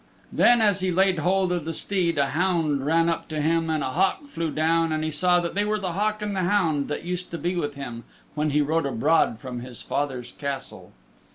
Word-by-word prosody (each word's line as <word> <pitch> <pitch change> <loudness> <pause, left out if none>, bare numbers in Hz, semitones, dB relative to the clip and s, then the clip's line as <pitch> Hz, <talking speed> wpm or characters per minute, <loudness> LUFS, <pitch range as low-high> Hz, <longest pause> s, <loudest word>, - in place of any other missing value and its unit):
Then 240 -2 +5
as 205 -2 +3
he 185 0 0
laid 190 -1 +2
hold 185 +3 +1
of 175 -3 -1
the 165 +1 -4
steed 175 -2 0
a 140 -1 +2
hound 155 -5 0
ran 165 +1 +3
up 165 - -1
to 155 -1 -4
him 165 +2 +1
and 155 -2 0
a 130 - -2
hawk 190 - +1
flew 165 - -3
down 165 +2 +1
and 155 0 -1
he 155 - -1
saw 180 +4 +3
that 170 -1 -3
they 205 - +1
were 210 +1 0
the 185 -3 -3
hawk 210 +3 -1
and 205 -1 -3
the - - -1
hound 165 -7 +1
that - - -4
used 180 0 -4
to 170 - -5
be 175 +2 -2
with 145 -4 -2
him 120 -4 -7 0.3
when 150 +1 0
he 150 +1 +2
rode 155 +1 0
abroad 135 0 +2
from 125 -1 -6
his 125 -1 -9
father's 135 -4 -3
Castle. 140 -2 -6
165 Hz, 235 wpm, -25 LUFS, 145-185 Hz, 0.3 s, Then